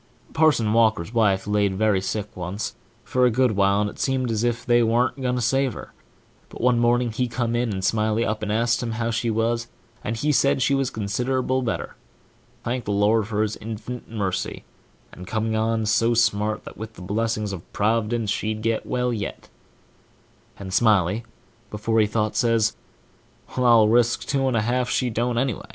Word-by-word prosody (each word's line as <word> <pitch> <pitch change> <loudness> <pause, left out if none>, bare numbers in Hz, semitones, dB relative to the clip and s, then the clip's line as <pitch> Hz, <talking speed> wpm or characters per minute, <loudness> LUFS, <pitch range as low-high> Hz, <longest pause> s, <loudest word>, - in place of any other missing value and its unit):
Parson 150 -9 +3
Walker's 110 -4 +2
wife 105 -5 +2
laid 105 -2 +1
very 105 -1 +2
sick 100 +2 -4
once, 90 +4 -4 0.3
for 125 +1 +2
a - - +4
good 125 +1 +2
while, 100 0 +2
and 105 - 0
it - - -16
seemed 130 -3 0
as 110 0 -1
if 120 0 -1
they 120 0 +4
warn't 120 +4 +1
going 125 -1 0
to 125 - -1
save 135 +1 +1
her; - - -10 0.6
but - - -11
one 125 0 +3
morning 120 0 +2
he 125 +3 -1
come 120 -1 -2
in, 120 -1 0
and 95 -1 -3
Smiley 110 +1 +1
asked 110 +2 0
ho!! 120 - -3
w 115 +1 -2
she 115 +1 -1
was, 115 +1 0 0.4
and 115 +1 -3
he 150 +6 +1
said 140 -1 +3
she 135 +2 +2
was 135 -2 +1
considerable 125 +4 -1
better&#8212thank 120 - -6
the 105 - -2
Lord 105 +1 +2
for 110 -1 0
his 110 0 -2
inf'nit 115 +3 -7
mercy&#8212and 95 -3 -6
coming 110 0 -1
on 110 0 0
so 115 +2 +2
smart 105 -2 +1
that, - - -11
with 110 0 -7
the 90 - -11
blessing 110 +3 -1
of 90 -3 -9
Prov'dence, 110 0 0
she'd 110 0 -2
get 115 0 -1
well 125 -1 0
yet; 105 -3 -5 1.1
and 95 -2 -7
Smiley, 105 0 +2 0.4
before 110 +2 0
he 105 - +4
thought, 105 0 -1
says, 115 -3 +2 0.8
"Well, 125 -1 +2
I'll 115 -3 +6
risk 120 +1 +3
two 135 -2 0
and 125 -3 +1
a - - +2
half 125 +3 0
that - - -2
she 125 -2 0
don't, 120 +2 -1
anyway." 125 -2 -2
115 Hz, 185 wpm, -23 LUFS, 105-120 Hz, 1.1 s, I'll